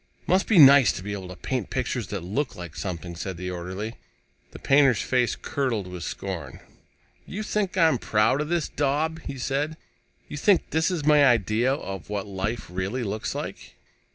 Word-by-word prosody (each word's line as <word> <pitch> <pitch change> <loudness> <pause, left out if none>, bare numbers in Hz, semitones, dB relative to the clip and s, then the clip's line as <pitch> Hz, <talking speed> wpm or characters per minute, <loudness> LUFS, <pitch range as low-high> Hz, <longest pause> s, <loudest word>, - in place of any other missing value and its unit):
"Must 190 +2 +2
be 220 - +3
nice 140 -3 +8
to 90 - -7
be 100 +1 -4
able 95 -2 -6
to 90 0 -9
make 125 -6 -1
pictures 125 -4 -2
that 100 -3 -4
look 115 +8 -2
like 85 -4 -8
something," 85 +2 -5
said 90 +2 -5
the 90 +1 -4
orderly. 95 +6 -5 0.5
The - - -11
painter's 135 -4 +4
face 125 -2 +1
curdled 125 -8 -2
with 90 -1 -8
scorn. 85 -7 -5 0.7
"You 210 +3 -5
think 205 -3 -1
I'm 160 -8 +4
proud 110 +7 +2
of 150 - -3
this 170 -2 0
daub?" 150 +3 -1
he 140 - -7
said. 145 +5 -2 0.5
"You 150 - -7
think 190 +5 +2
this 160 +2 +2
is 170 -6 -2
my 150 -1 +6
idea 120 0 +3
of 95 - -5
what 105 -1 -3
life 100 +3 -3
really 95 +8 -3
looks 105 0 -3
like?" - - -7
120 Hz, 180 wpm, -25 LUFS, 95-145 Hz, 0.7 s, nice